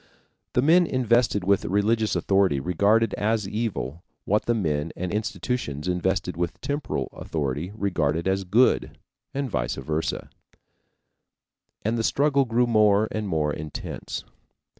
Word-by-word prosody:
The 125 - +2
men 170 +4 +5
invested 120 -6 +2
with 100 +1 +2
religious 110 +3 +1
authority 95 -7 +2
regarded 100 +9 +2
as 110 -1 0
evil 100 - -3 0.2
what 105 +2 +1
the 120 - +2
men 80 -6 -1
and 90 +1 -3
institutions 100 - -3
invested 90 -1 0
with 85 0 -3
temporal 145 +1 -3
authority 75 +3 -3
regarded 85 -5 0
as 95 0 +1
good 110 +8 +2 0.3
and 140 0 -2
vice 70 - -2
versa, 80 +1 -3 1.5
and 115 +2 0
the - - 0
struggle 140 +2 +2
grew 120 +1 +2
more 110 -2 +4
and 110 -1 -3
more 75 -4 0
intense. 75 -1 -6
100 Hz, 130 wpm, -25 LUFS, 85-115 Hz, 1.5 s, men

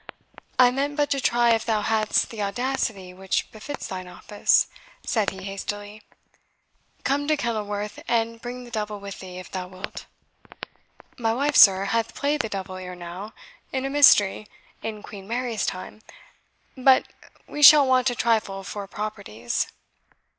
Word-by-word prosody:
"I 250 -1 +6
meant 285 +3 -2
but 290 -1 +1
to 275 - +1
try 240 -1 +3
if 225 -1 +2
thou 220 -2 0
hadst 220 -1 +1
the 220 -2 -6
audacity 205 -3 -2
which 190 +1 -2
befits 275 +7 -7
thine 185 -1 -6
office," 190 +3 +2 0.4
said 220 -4 +1
he 190 0 -10
hastily. 205 +2 -6 1.0
"Come 285 +1 0
to 310 0 +2
Kenilworth, 210 -4 -3
and 230 -1 0
bring 250 +1 -6
the 240 - -13
devil 210 -2 -3
with 200 -1 -8
thee, 180 -1 -9
if 185 -1 -10
thou 185 -1 -4
wilt." 185 +2 -9 1.1
"My 225 -1 +1
wife, 285 +3 0
sir, 195 -1 +7
hath 230 +2 -1
played 290 +1 0
the 225 - -5
devil 190 -2 -5
ere 180 -1 -7
now, 180 +5 -8 0.4
in 265 0 -2
a 270 - -2
Mystery, 215 -8 +5 0.3
in 215 -2 -6
Queen 195 -2 -10
Mary's 235 -2 -2
time; 185 +3 -6 0.7
but 260 0 +5 0.4
me 295 - -6
shall 295 0 +10
want 255 0 +3
a 245 - -3
trifle 215 -4 0
for 200 +1 -6
properties." 200 - -4
215 Hz, 155 wpm, -24 LUFS, 195-250 Hz, 1.1 s, shall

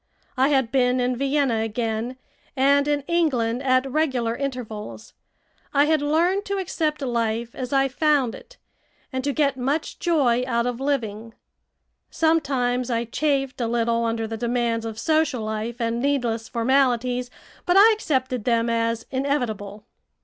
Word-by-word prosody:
I 265 +1 +3
had 265 -5 +1
been 255 -1 +2
in 250 0 0
Vienna 275 -2 +1
again, 225 +2 -2 0.4
and 280 +2 +4
in 290 -1 +1
England 265 -7 0
at 255 -1 +2
regular 260 -5 0
intervals. 240 -6 -6 0.6
I 285 +1 +5
had 310 -1 +2
learned 340 +7 +1
to 400 -1 -2
accept 310 -5 -2
life 235 -2 -1
as 255 -2 -5
I 270 -1 +3
found 275 -3 +1
it, - - -13 0.6
and 260 0 -2
to 285 - 0
get 280 -1 +1
much 275 +5 -2
joy 270 -8 +2
out 235 -1 0
of 245 -1 -2
living. 230 -5 -3 0.7
Sometimes 265 -6 +1
I 235 -1 0
chafed 270 +1 -1
a 235 - 0
little 235 0 +1
under 225 -1 -1
the 225 0 -5
demands 235 -1 -1
of 220 -1 -6
social 310 -3 +1
life 220 +2 -4
and 230 0 -1
needless 245 -5 -1
formalities, 250 0 +1 0.4
but 355 +2 +4
I 425 +3 +8
accepted 260 - -1
them 230 0 +1
as 230 0 -1
inevitable. 225 -7 -2
255 Hz, 150 wpm, -23 LUFS, 230-280 Hz, 0.7 s, I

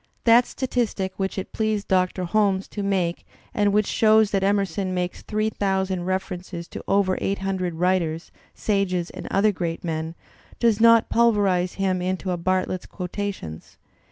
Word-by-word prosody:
That 235 +1 +6
statistic 235 -7 -2
which 195 0 -2
it 190 - -4
pleased 215 -2 -1
Doctor 185 -1 +1
Holmes 195 0 +1
to 205 - -5
make 185 -4 -1 0.3
and 205 -1 +2
which 210 +1 +3
shows 220 -1 +4
that 195 - +1
Emerson 195 -1 0
makes 180 0 -3
three 215 0 -1
thousand 190 -3 -1
refer 185 0 -2
ences 175 -1 -8
to - - -7
over 195 -2 +2
eight 195 - 0
hundred 190 -3 -2
writers, 170 -2 0 0.2
sages, 185 -4 0
and - - -8
other 210 +2 +3
great 170 -3 -4
men, 160 -1 -3 0.4
does 230 -3 +3
not 230 -1 +6
pulverize 200 -6 +2
him 190 -2 0
into 185 +1 -2
a 175 - -1
Bartlett's 185 +1 -1
Quotations. 180 - -6
190 Hz, 155 wpm, -24 LUFS, 180-205 Hz, 0.4 s, That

